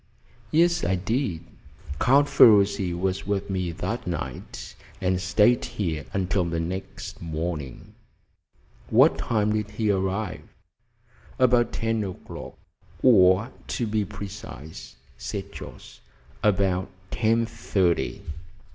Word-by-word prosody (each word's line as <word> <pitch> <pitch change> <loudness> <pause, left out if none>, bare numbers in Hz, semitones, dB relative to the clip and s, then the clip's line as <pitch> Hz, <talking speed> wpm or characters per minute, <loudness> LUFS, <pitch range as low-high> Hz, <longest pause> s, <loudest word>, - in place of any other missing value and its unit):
"Yes, 170 +4 +3
I 95 +2 +2
did. 95 - -1 0.6
Count 140 +3 +5
Ferruci 100 -6 +5
was 95 +2 -2
with 100 -1 -1
me 90 -2 -1
that 115 +7 -4
night, 85 -4 -5 0.3
and 90 0 0
stayed 105 +6 +3
here 90 - -3
until 95 0 0
the 85 -1 -2
next 90 +3 -5
morning." 80 -4 -5 1.0
"What - - +5
time 105 -2 +1
did 105 -1 -1
he 105 0 0
arrive?" 95 +1 -1 1.0
"About 125 -2 +4
ten 115 -1 -1
o'clock, 95 -2 -8 0.5
or, 100 -1 +5 0.2
to 120 - -1
be 110 -1 0
precise," 100 -6 -9 0.2
said 65 0 -5
Jorce, - - -11 0.4
"about 95 -4 +1 0.2
ten 115 +1 +2
thirty." 90 - 0
100 Hz, 110 wpm, -25 LUFS, 90-110 Hz, 1.0 s, Count